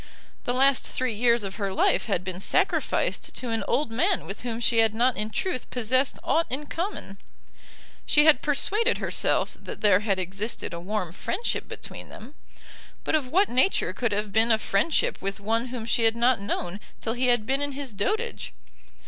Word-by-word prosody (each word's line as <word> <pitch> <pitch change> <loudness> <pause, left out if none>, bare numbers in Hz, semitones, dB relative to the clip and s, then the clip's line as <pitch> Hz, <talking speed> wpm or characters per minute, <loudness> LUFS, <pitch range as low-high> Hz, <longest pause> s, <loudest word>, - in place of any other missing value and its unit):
The 245 - 0
last 270 +1 +3
three 255 -2 -2
years 235 +1 +2
of 195 0 -6
her 200 -3 -2
life 190 - +2
had 190 -4 0
been 185 -1 -5
sacrificed - - 0
to 250 - -3
an 225 - -1
old 280 -5 0
man 350 - +1
with 195 - -7
whom 235 -2 -4
she 235 -1 +2
had 220 -1 +3
not 245 +2 +3
in 210 +1 -1
truth 255 +2 -3
possessed 255 +3 +1
aught 330 +1 +1
in 275 +4 -2
common. 325 - -5 0.9
She 295 0 +5
had 305 -5 +6
persuaded 420 - +2
herself - - 0
that - - -8
there 200 -3 +5
had 205 -2 0
existed 195 +2 -4
a 170 - -5
warm 185 -1 -3
friendship 360 - -3
between - - -8
them; 235 +7 -11 0.7
but - - -2
of 305 -4 +1
what 385 +8 +3
nature 260 +10 +2
could 240 -3 -1
have 205 0 -2
been 225 +2 +4
a 220 - +5
friendship 220 +8 0
with 195 +2 -3
one 225 +4 0
whom 245 -3 -6
she 230 +1 +1
had 225 0 +3
not 235 -1 +2
known 200 -1 -3 0.2
till 225 - -2
he 250 +1 0
had 240 -3 +3
been 270 +4 0
in 285 -1 0
his 270 -4 -5
dotage? 435 - -2
235 Hz, 190 wpm, -26 LUFS, 210-275 Hz, 0.9 s, had